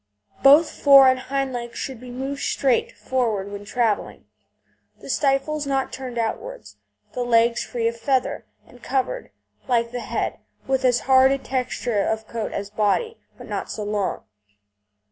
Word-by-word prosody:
Both 300 +3 +7
fore 275 -2 +7
and 260 0 +3
hind 270 0 -2
legs 240 -1 -6
should 260 -4 -5
be 250 +1 -11
moved 270 +3 -5
straight 260 -4 +1
forward 220 -6 -1
when 205 0 -7
travelling, 225 -1 -1 0.7
the - - -6
stifles 285 +1 0
not 270 -1 -1
turned 255 -2 -6
outwards, 475 - -4 0.4
the 250 - -3
legs 235 0 +3
free 230 -2 -2
of 230 0 -2
feather, 260 +1 -1 0.2
and 245 - -18
covered, 275 - -2 0.4
like 235 -2 +1
the 245 - -4
head, - - -3 0.3
with 265 0 0
as 245 -1 +3
hard 265 0 +5
a 275 - +2
texture 250 -4 -2
of 220 +2 -2
coat 230 -1 -4
as 200 0 -5
body, 215 - 0 0.2
but - - -11
not - - -4
so 210 - -4
long. 205 -2 -2
255 Hz, 160 wpm, -23 LUFS, 230-270 Hz, 0.7 s, Both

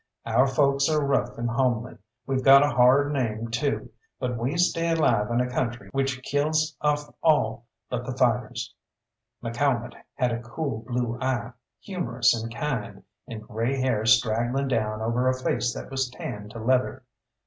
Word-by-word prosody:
Our 115 +4 +3
folks 140 +1 +2
are 150 -2 +1
rough 140 - 0
and 120 0 -2
homely; 120 -1 -1 0.3
we've 135 0 -1
got 140 +1 +8
a 145 - 0
hard 130 +4 +4
name, 115 -4 -2
too, 120 +5 -2 0.3
but 125 -2 -2
we 125 +8 -2
stay 170 -1 +2
alive 120 -10 +2
in 120 +1 +1
a 125 - 0
country 120 -1 -3
which 135 -1 -1
kills 155 +3 0
off 145 0 0
all 120 -7 +2 0.2
but 125 +1 -4
the 130 -1 -4
fighters. 120 -2 0 0.7
McCalmont 120 0 0 0.2
had 125 -1 +1
a 115 0 -3
cool 120 0 -4
blue 120 -1 -2
eye, 125 -2 -1 0.3
humorous 130 - +1
and 115 0 -4
kind, 135 -5 -4 0.2
and 110 -2 -7
grey 120 +4 -1
hair 130 -5 +1
straggling 120 +4 +2
down 110 -3 -1
over 120 +3 +1
a 130 0 +1
face 120 -1 0
that - - -8
was 135 -1 -1
tanned 105 -4 -7
to 115 - -10
leather. 125 +3 0
125 Hz, 165 wpm, -26 LUFS, 115-140 Hz, 0.7 s, got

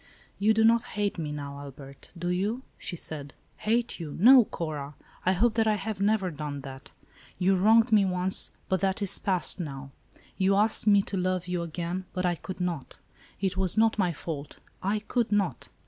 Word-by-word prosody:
"You 215 +2 +3
do 220 - +3
not 230 +1 +5 0.2
hate 205 -3 -1
me, 150 -2 -3
now, 140 -1 -6
Albert, 140 -1 -11
do 175 +1 -3
you?" 205 +8 -1 0.2
she - - -5
said. 145 -4 -6 0.2
"Hate 235 0 -1
you; 155 -4 -6
no, 250 +4 +8
Cora. 150 -5 -5 0.3
I 185 - +5
hope 220 +5 +2
that 225 -1 +2
I 215 - +3
have 205 -1 -4
never 200 -3 +1
done 145 -2 -5
that. 135 0 -10 0.5
You 190 +1 +3
wronged 225 +5 +4
me 210 -2 +6
once, 185 0 +1 0.2
but 190 - +1
that 195 +3 0
is 195 - +1
passed, 185 -1 +1
now. 135 -4 -6 0.5
You 195 +1 +3
asked 215 +1 +2
me 200 -1 +6
to 195 - -3
love 185 0 -1
you 180 -1 -1
again, 170 +2 -4
but 185 -1 -1
I 175 - +2
could 185 +2 -8
not. 175 -6 -4 0.4
It 190 -1 -1
was 190 +1 +1
not 220 -1 +3
my 180 -3 +2
fault; 150 -2 -6 0.2
I 205 +3 0
could 230 +1 -1
not." 205 -3 0
185 Hz, 195 wpm, -28 LUFS, 165-210 Hz, 0.5 s, no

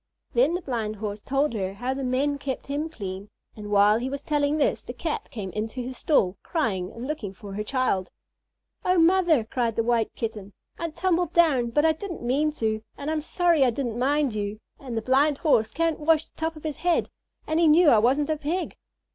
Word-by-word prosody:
Then 475 -8 +3
the 360 - -4
Blind 225 -6 -2
Horse 210 0 -5
told 275 +2 0
her 195 -3 -3
how 245 +5 -2
the 270 0 -4
men 275 +3 0
kept 275 -2 -4
him 290 +3 -3
clean; 195 -7 -7 0.3
and 210 -1 -8
while 205 +1 +5
he 255 +2 -3
was 280 +1 -5
telling 295 0 +1
this 295 - +1
the 245 - -8
Cat 310 +5 -4
came 195 -5 -6
into 220 +5 -4
his 255 +1 -5
stall, 195 - +2
crying 200 - -1
and 230 +2 -7
looking 250 -10 -4
for 200 +1 -9
her 210 +2 -3
child. 215 -6 0 0.7
"Oh, 365 0 +2
mother," 335 -5 +4
cried 230 0 -1
the 230 - +1
White 230 -1 +1
Kitten, 210 -3 -5 0.3
"I 335 - -2
tumbled 350 0 0
down, 285 -9 +4
but 295 +6 +2
I 320 - +6
didn't 345 -2 -6
mean 275 +6 +2
to, 220 -5 -1 0.2
and 285 +2 -3
I'm 315 -1 -1
sorry 335 -1 +2
I 255 - +4
didn't 240 -1 -3
mind 280 0 +1
you, 205 0 -3 0.2
and 250 -4 -6
the 225 - -2
Blind 275 +4 +3
Horse 230 -10 +2
can't 330 +1 0
wash 315 +1 +3
the - - -27
top 320 0 -2
of 310 - -12
his 310 -2 -4
head, 350 -1 +1 0.3
and 315 +1 0
he 335 - +5
knew 325 +4 +6
that 265 -7 +7
I - - +5
wasn't 275 +7 +2
a 310 - 0
Pig." 325 +5 -3
270 Hz, 220 wpm, -25 LUFS, 220-310 Hz, 0.7 s, that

